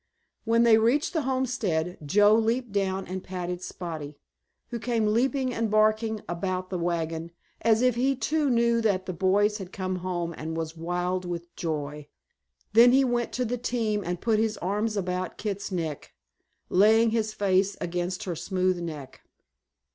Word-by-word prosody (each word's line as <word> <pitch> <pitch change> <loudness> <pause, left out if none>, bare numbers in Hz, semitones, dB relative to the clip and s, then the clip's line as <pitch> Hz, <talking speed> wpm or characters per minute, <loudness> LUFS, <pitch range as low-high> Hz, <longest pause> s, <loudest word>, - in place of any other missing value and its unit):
When 230 +1 +4
they 225 -2 +6
reached 245 +10 +2
the 320 - +1
homestead 225 -11 -1
Joe 205 +7 +5
leaped 230 +2 +1
down 195 -1 -1
and 185 0 -5
patted 180 -1 -4
Spotty, 155 -6 -6 0.5
who 235 - -4
came 230 -2 0
leaping 260 +2 +1
and 225 -1 -1
barking 215 0 +2
about 185 +2 -3
the 180 - -2
wagon, 165 -1 -2 0.3
as 225 +1 +3
if 250 -1 +4
he 260 +4 +1
too 300 +2 0
knew 235 -1 +3
that 200 -4 +1
the 185 - -4
boys 205 +4 +2
had 190 -1 -8
come 185 -1 -3
home 175 -2 -3
and 160 +1 -5
was 165 0 -4
wild 180 +2 -2
with 175 -1 -6
joy. 150 -2 -4 0.7
Then 240 +3 +7
he 270 +1 +5
went 240 -1 0
to 250 - -1
the 245 +1 -2
team 225 -4 -1
and 175 0 -3
put 220 +1 +1
his 220 -1 0
arms 210 +4 -1
about 185 -1 -2
Kit's 200 -2 -4
neck, 160 -5 -4 0.5
laying 220 +4 +5
his 220 -1 0
face 195 -1 +1
against 175 +1 -3
her 180 -3 -3
smooth 185 +1 0
neck. 155 -6 -7
195 Hz, 165 wpm, -27 LUFS, 175-230 Hz, 0.7 s, Then